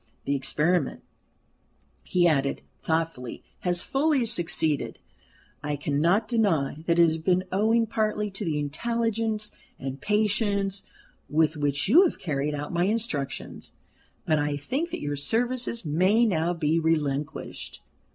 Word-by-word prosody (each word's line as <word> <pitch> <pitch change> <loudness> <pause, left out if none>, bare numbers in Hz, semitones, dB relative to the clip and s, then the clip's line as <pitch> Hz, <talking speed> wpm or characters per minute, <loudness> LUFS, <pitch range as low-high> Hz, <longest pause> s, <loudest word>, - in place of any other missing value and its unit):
The 140 - +1
experiment," 150 +3 0 1.0
he 175 -1 +2
added, 140 -4 +1 0.2
thoughtfully, 160 -7 -2 0.2
"has 175 -1 +1
fully 275 -2 +2
succeeded. 165 -8 0 0.6
I 145 0 -2
cannot 155 +9 +1
deny 175 - +1
that 170 0 +3
it 170 - +7
has 160 -1 +2
been 180 +3 +2
owing 220 +4 +3
partly 215 -2 -1
to 195 +2 -5
the 160 -5 -1
intelligence 220 +7 -1 0.3
and 135 0 -6
patience 205 0 +1 0.5
with 155 +2 +2
which 145 0 0
you 315 - +7
have 345 - -1
carried 150 -2 -2
out 145 +2 -5
my 175 +1 +2
instructions. 175 -11 -3 0.5
But 155 -1 +2
I 145 0 0
think 270 - -2
that - - -5
your 145 0 -2
services 235 - -1
may 185 +10 +3
now 175 -4 +1
be 160 0 +1
relinquished." 150 -2 -2
170 Hz, 130 wpm, -26 LUFS, 150-215 Hz, 1.0 s, it